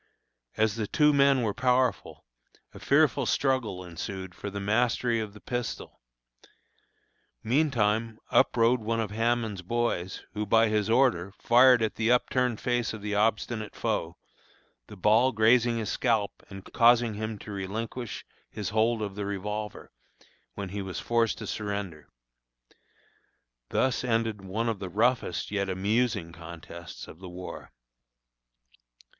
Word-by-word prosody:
As 110 0 +1
the 110 -2 -2
two 150 +5 +3
men 140 -2 +4
were 105 -3 0
powerful, 125 -1 0 0.5
a - - -11
fearful - - +3
struggle 120 -9 0
ensued 95 +2 -6
for 100 - -6
the 100 0 -5
mastery 115 +3 +1
of 105 -2 -5
the - - -11
pistol. 120 +1 -5 1.4
Meantime 115 -4 +1
up - - +3
rode 115 +1 +3
one 115 +1 -1
of 110 -3 -2
Hammond's 115 -2 0
boys, 95 -3 -2
who, 105 - -2
by 110 +2 +4
his 105 -1 0
order, 115 -7 +2
fired 125 0 +6
at 110 - -2
the 115 +1 +2
upturned 125 -1 +1
face 120 -2 -1
of 110 -2 -8
the 105 0 -3
obstinate 110 +1 0
foe, - - -2 0.7
the 105 - -11
ball 110 +7 +4
grazing 115 +1 +3
his 110 -3 -2
scalp 110 -5 +1 0.2
and 95 0 -10
causing 120 -1 +5
him 110 +1 -4
to 105 - -10
relinquish 110 +5 -5 0.2
his 105 -2 -4
hold 110 +1 +1
of 100 -2 -4
the 100 0 -4
revolver, 105 +1 -5 0.6
when 100 -2 -5
he 100 +2 -4
was 95 -1 -5
forced 115 -1 +1
to - - -7
surrender. 100 -7 -5 1.6
Thus 130 -1 +1
ended 115 -3 0
one 110 +5 -2
of 110 -4 -1
the 95 - -5
roughest 115 -2 0
yet 100 -1 -1
amusing 100 -1 0
contests 85 0 -10
of 80 - -13
the 95 -1 -9
war. 90 +1 -9
110 Hz, 140 wpm, -28 LUFS, 100-120 Hz, 1.6 s, fired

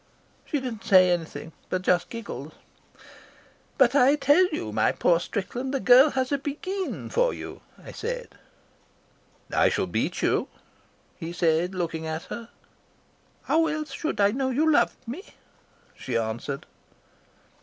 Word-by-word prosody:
"She 295 - -1
did 255 -2 -4
not 220 - -11
say 185 -2 +6
anything, 165 -2 -3 0.2
but 185 0 -2
just 180 -1 +2
giggled. 160 - -7 1.2
"'But 265 -4 +5
I 280 +1 +5
tell 300 +5 +4
you, 300 - -4
my 110 0 +2
poor 170 -1 +2
Strickland, 245 +9 -4
the - - +1
girl 255 +4 +7
has 260 -1 -1
a 280 -1 0 0.7
for - - +2
you,' - - -8 0.2
I - - -11
said. - - -5 1.2
"I - - +4
shall - - 0
beat - - -2
you,' - - +1 0.7
he 165 -2 -6
said, 175 +1 +1
looking 165 -3 -3
at 160 +1 -4
her. 230 0 -7 0.9
"'How 325 0 +2
else 305 0 -3
should 315 - -3
I 200 0 +5
know 260 +3 -1
you 305 +5 +2
loved 275 -4 +1
me,' 315 - -8 0.6
she 125 -3 -3
answered." 115 +5 -3
230 Hz, 145 wpm, -26 LUFS, -, 1.2 s, girl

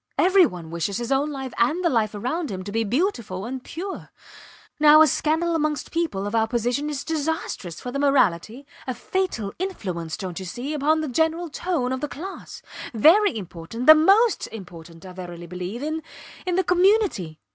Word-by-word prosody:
Every 370 -1 +5
one 170 -6 -9
wishes 170 +4 -2
his 240 +2 -4
own 275 +2 +2
life 265 -3 -6
and 310 +10 +2
the - - +5
life 220 -4 +1
around 270 +9 -2
him 185 -1 -5
to 200 - -6
be 225 +2 0
beautiful 230 - -1
and 255 +1 -5
pure. 375 +4 -7 0.7
Now, 305 +1 +8
a - - +6
scandal 320 +4 +1
amongst 305 -2 -1
people 320 - -1
of 205 - -4
our 225 -1 +2
position 245 +5 -1
is 285 -2 -4
disastrous 310 - -3
for 245 - -6
the 280 - -3
morality 255 -3 +1 0.2
a 255 - -2
fatal 240 - -2
influence 185 - -4
dont 185 -2 -5
you 190 - -7
see 250 - -5
upon 305 +2 +2
the 310 - -2
general 320 +5 0
tone 300 -6 -2
of 260 - -4
the 295 - -1
class 365 +7 -8 0.3
very 330 - +5
important 180 +5 -6
the 310 - +11
most 390 +9 +4
important, 170 -5 -11
I 185 - -9
verily 175 -2 -8
believe, 180 - -6
in 315 +1 -2 0.5
in 360 - +1
the 375 - +2
community. 360 - +2
265 Hz, 185 wpm, -24 LUFS, 200-320 Hz, 0.7 s, the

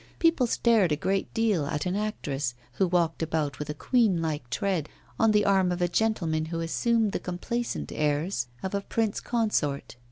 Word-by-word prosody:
People 330 -7 +3
stared 225 -7 +3
a - - +3
great 190 +6 -1
deal 210 -10 +1
at 150 +1 -2
an 180 +1 -1
actress, 145 - -2 0.2
who 190 - +4
walked 170 -2 +1
about 155 -3 -1
with 150 - -5
a 150 - -3
queen 220 - +2
like 150 -6 -3
tread, 175 +3 -1 0.3
on 225 - +5
the 210 -1 +3
arm 190 -2 +3
of 175 - -2
a 175 - +2
gentleman 170 -6 0
who 165 +1 -4
assumed 220 +6 +1
the - - -2
complacent 180 - -3
airs 150 -2 0 0.2
of 190 - -3
a 200 - 0
prince 220 +1 -1
consort. 210 - -1
180 Hz, 185 wpm, -27 LUFS, 155-215 Hz, 0.3 s, on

